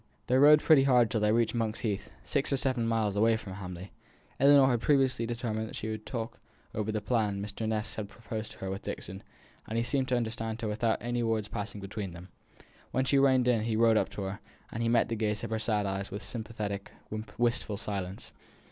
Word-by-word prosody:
They 125 - +1
rode 150 +2 +8
pretty 145 -4 +6
hard 125 -4 +4
till 110 - 0
they 105 0 +3
reached 115 0 +2
Monk's 115 -2 -1
Heath, 105 -4 -2
six 140 -1 0
or 135 - +2
seven 130 -3 0
miles 110 -3 +1
away 110 +2 +4
from 100 -3 -8
Hamley. 90 -1 -7 0.5
Ellinor 140 0 +7
had 120 -2 +1
previously 130 -5 +2
determined 115 -2 -2
that - - -9
here - - -4
she - - -2
would 110 0 -6
talk 115 -2 -4 0.3
over 110 0 -1
the 110 0 -2
plan 105 -4 0
Mr. 105 +2 -4
Ness 110 -1 -2
had 105 -2 -5
proposed 110 -2 -6
to - - -17
her 95 0 -3
with 95 - -4
Dixon, 95 +2 -6 0.5
and 110 - -3
he 115 - +2
seemed 130 +1 +1
to 125 - +2
understand 115 -1 -3
her - - 0
without 110 +2 +1
any 120 0 -1
words 110 -2 0
passing 105 -1 -5
between 100 -2 -5
them. 85 +2 -11 0.6
When 130 - 0
she 140 +1 +3
reined 130 -2 +4
in 120 -3 +3
he 115 -1 0
rode 115 0 +5
up - - +2
to 100 - -4
her, 95 +1 -4 0.3
and 115 +1 -1
met 115 - +4
the 115 - -2
gaze 105 -1 -1
of 115 - -4
her 110 - 0
sad 110 -2 0
eyes 95 0 -3
with 100 +3 -6
sympathetic, 105 -3 -4 0.5
wistful 115 -3 +1
silence. 100 -3 -5
110 Hz, 220 wpm, -30 LUFS, 105-120 Hz, 0.6 s, rode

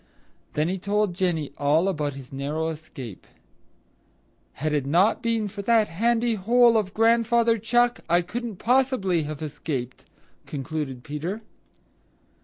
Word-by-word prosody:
Then 150 +2 +1
he 185 +2 -2
told 205 0 0
Jenny 170 -6 -1
all 150 +5 +3
about 150 -7 -1
his 135 -1 -11
narrow 150 +4 -2
escape. 140 - -9 1.3
"Had 155 +1 -2
it 145 -2 0
not 180 +9 +3
been 230 -2 0
for 200 +1 -6
that 220 0 +3
handy 230 +6 +1
hole 235 +3 +4
of 205 -3 0
Grandfather 230 0 +3
Chuck, 240 +3 +2
I 175 +1 +4
couldn't 235 +4 -5
possibly 240 -6 +2
have 155 0 -6
escaped," 140 -4 -5 0.4
concluded 135 -3 -4
Peter. 170 +9 -4
185 Hz, 130 wpm, -25 LUFS, 150-225 Hz, 1.3 s, hole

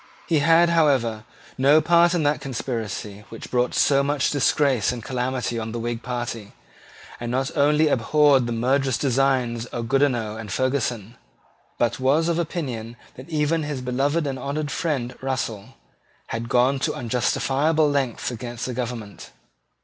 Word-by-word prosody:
He 160 -3 +2
had, 165 +3 +5
however, 130 -9 +2 0.3
no 140 +4 +6
part 170 +2 +4
in 165 - +1
that 145 +1 +1
conspiracy 110 -6 -5
which 115 - -10
brought 125 0 +1
so 140 -1 +4
much 145 -1 0
disgrace 135 -4 +2
and 120 -3 -6
calamity 125 -1 -2
on 110 0 -5
the 120 - -3
Whig 120 0 -3
party, 120 -4 -5 0.7
and 120 - -4
not 130 +2 -2
only 150 +1 +3
abhorred 140 0 +3
the - - -3
murderous 130 +2 +1
designs 130 -3 0
of 120 -2 -5
Goodenough 120 -6 +1
and 110 -3 -7
Ferguson, 120 -4 -2 0.6
but 120 0 0
was 145 +6 +2
of 170 0 0
opinion 130 -9 -4 0.2
that 130 +6 -12
even 155 +1 +1
his 145 -3 -4
beloved 140 +6 0
and 135 -2 -3
honoured 145 +2 -3
friend 135 -7 -2
Russell, 120 -6 -4 0.5
had 115 +1 -4
gone 130 +2 +3
to - - -1
unjustifiable 135 +6 +1
lengths 135 -5 -1
against 120 0 -6
the 125 - -4
government. 115 -4 -6
130 Hz, 150 wpm, -23 LUFS, 120-145 Hz, 0.7 s, no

